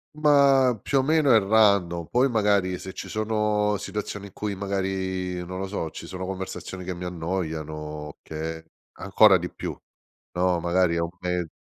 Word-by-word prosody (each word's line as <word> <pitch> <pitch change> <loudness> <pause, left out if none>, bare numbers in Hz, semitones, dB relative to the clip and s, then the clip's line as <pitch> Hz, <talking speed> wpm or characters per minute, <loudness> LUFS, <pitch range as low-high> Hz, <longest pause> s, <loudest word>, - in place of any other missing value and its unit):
Ma 140 -5 +4
più 135 +7 +1
o - - +4
meno 150 -1 +3
è 110 - +7
random, 100 -5 +3
poi 125 +9 +2
magari 100 -5 +2
se 95 +1 -8
ci - - -7
sono 105 -1 0
situazioni 105 0 -5
in 100 - -15
cui 105 -1 -3
magari, 95 -2 -2
non 95 +1 -6
lo 95 - -3
so, 95 -5 -3
ci - - -9
sono 95 0 -6
conversazioni 95 0 -6
che 90 0 -4
mi 90 +1 -8
annoiano, 80 -4 -4
che 80 +1 -6 0.4
ancora 100 -1 +5
di 90 +1 -4
più, - - -5 0.6
no, 90 -1 +1
magari 85 0 +2
è - - +1
un 85 0 -1
me 90 -1 -1
95 Hz, 170 wpm, -25 LUFS, 90-105 Hz, 0.6 s, è